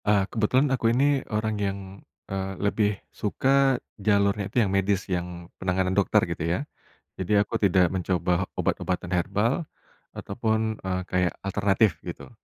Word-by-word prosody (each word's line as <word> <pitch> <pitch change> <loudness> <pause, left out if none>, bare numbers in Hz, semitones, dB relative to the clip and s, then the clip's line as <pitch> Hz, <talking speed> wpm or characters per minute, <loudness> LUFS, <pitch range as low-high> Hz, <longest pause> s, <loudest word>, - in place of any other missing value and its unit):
Nah 100 -2 +3
kebetulan 125 +5 +2
aku 125 - -1
ini 140 +2 +3
orang 110 0 -1
yang, 100 -1 -1 0.5
eee, 95 0 -3
lebih 105 0 +1 0.2
suka 135 +5 +2 0.2
jalurnya 100 0 +2
itu - - -6
yang 95 - -2
medis 100 0 +1
yang 90 -1 -4 0.2
penanganan 95 0 0
dokter 100 -1 +3
gitu - - -5
ya, - - 0 0.6
jadi 100 +2 +3
aku 100 - -3
tidak 95 -3 +3
mencoba 90 0 0
obat-obatan 90 -1 -1
herbal, 105 - 0 0.5
ataupun, 110 +1 -1
eee, 95 0 -1
kayak 90 -1 +1
alternatif 100 -1 +2
gitu, 85 - -7
100 Hz, 140 wpm, -26 LUFS, 95-110 Hz, 0.6 s, Nah